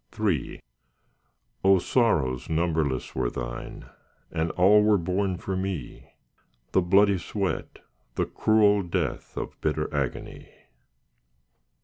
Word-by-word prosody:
III 95 Hz, -, -1 dB, 1.0 s
O 95 Hz, 0 st, +6 dB
sorrows 80 Hz, -, +1 dB
numberless 80 Hz, -5 st, -1 dB
were 65 Hz, -2 st, -1 dB
Thine, -, -, -7 dB, 0.5 s
And 80 Hz, 0 st, -1 dB
all 100 Hz, +4 st, +5 dB
were 105 Hz, 0 st, +4 dB
borne 95 Hz, +1 st, -1 dB
for 95 Hz, +2 st, -4 dB
me— 95 Hz, -8 st, -5 dB, 0.6 s
The 95 Hz, -, +3 dB
bloody 100 Hz, +2 st, +4 dB
sweat, 100 Hz, +2 st, -4 dB, 0.3 s
the -, -, 0 dB
cruel 105 Hz, -2 st, +3 dB
death 90 Hz, -2 st, -3 dB
Of -, -, -6 dB
bitter 75 Hz, 0 st, -1 dB
agony. 70 Hz, -3 st, -4 dB
90 Hz, 105 wpm, -26 LUFS, 75-100 Hz, 1.0 s, O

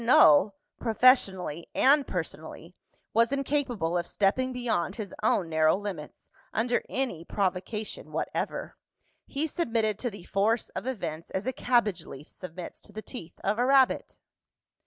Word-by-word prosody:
Null, 195 Hz, -, +6 dB, 0.2 s
professionally 195 Hz, -, +3 dB
and 280 Hz, +1 st, +5 dB
personally, 165 Hz, 0 st, -6 dB, 0.4 s
was 230 Hz, +2 st, +4 dB
incapable 255 Hz, -, 0 dB
of 170 Hz, -, -4 dB
stepping 255 Hz, +6 st, +1 dB
beyond 235 Hz, -7 st, -1 dB
his 210 Hz, -3 st, -6 dB
own 180 Hz, -, +2 dB
narrow 160 Hz, -1 st, +3 dB
limits, 195 Hz, -7 st, -7 dB, 0.2 s
under 240 Hz, +2 st, +1 dB
any 250 Hz, -12 st, -2 dB
provocation 200 Hz, +3 st, -3 dB
whatever. -, -, -3 dB, 0.5 s
He 285 Hz, +3 st, -1 dB
submitted 225 Hz, -, 0 dB
to 245 Hz, -, -1 dB
the 205 Hz, -5 st, -11 dB
force 210 Hz, +5 st, +1 dB
of -, -, -6 dB
events 165 Hz, -10 st, -4 dB
as 190 Hz, +3 st, -3 dB
a 260 Hz, -, -1 dB
cabbage 225 Hz, -9 st, +1 dB
leaf 140 Hz, +3 st, -10 dB
submits 180 Hz, -1 st, -8 dB
to -, -, -14 dB
the 215 Hz, +1 st, -7 dB
teeth 175 Hz, -10 st, -9 dB
of 210 Hz, +3 st, 0 dB
a 245 Hz, -, +3 dB
rabbit. 270 Hz, -1 st, +3 dB
210 Hz, 140 wpm, -28 LUFS, 175-250 Hz, 0.5 s, Null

